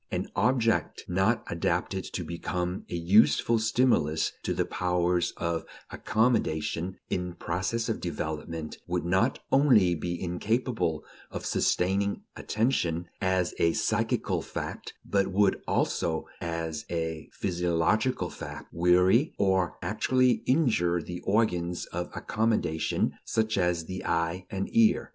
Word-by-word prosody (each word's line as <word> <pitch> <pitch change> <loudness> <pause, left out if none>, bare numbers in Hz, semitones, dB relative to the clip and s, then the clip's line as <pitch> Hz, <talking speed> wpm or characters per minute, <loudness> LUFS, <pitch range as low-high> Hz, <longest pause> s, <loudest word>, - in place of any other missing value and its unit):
An - - -3
object 115 -1 +1
not 95 +6 +1
adapted 85 0 -1
to - - -4
become 90 +1 -3
a - - -3
useful 105 +6 +4
stimulus 110 - +2
to - - -2
the - - +1
powers 90 -1 0
of 85 -1 -1 0.3
accommodation 95 -6 0
in 90 -1 -2
process 95 +7 -2
of 110 - -1
development 80 -1 -4
would 90 -1 -1
not 95 +9 +2
only 125 -10 +5
be 85 +1 -3
incapable 90 - -1 0.2
of - - -6
sustaining 100 +3 +1
attention 90 -8 0
as 95 -1 +1
a 85 0 +3
psychical - - 0
fact, - - -6
but 100 -1 +1
would 95 +1 +2
also, 80 -2 0 0.2
as 85 -2 -3
a 80 -2 -3
physiological 90 +6 0
fact, - - -8
weary 90 - +4
or 95 -3 +1
actually 125 +6 +2
injure 110 - +2
the 90 +3 -6
organs 90 -5 +1
of 90 +1 -5
accommodation 110 -8 0
such 110 -1 0
as 90 -3 +1
the 95 +2 -6
eye 85 +2 -1
and 95 0 -3
ear. 115 -1 +4
90 Hz, 120 wpm, -28 LUFS, 85-110 Hz, 0.3 s, only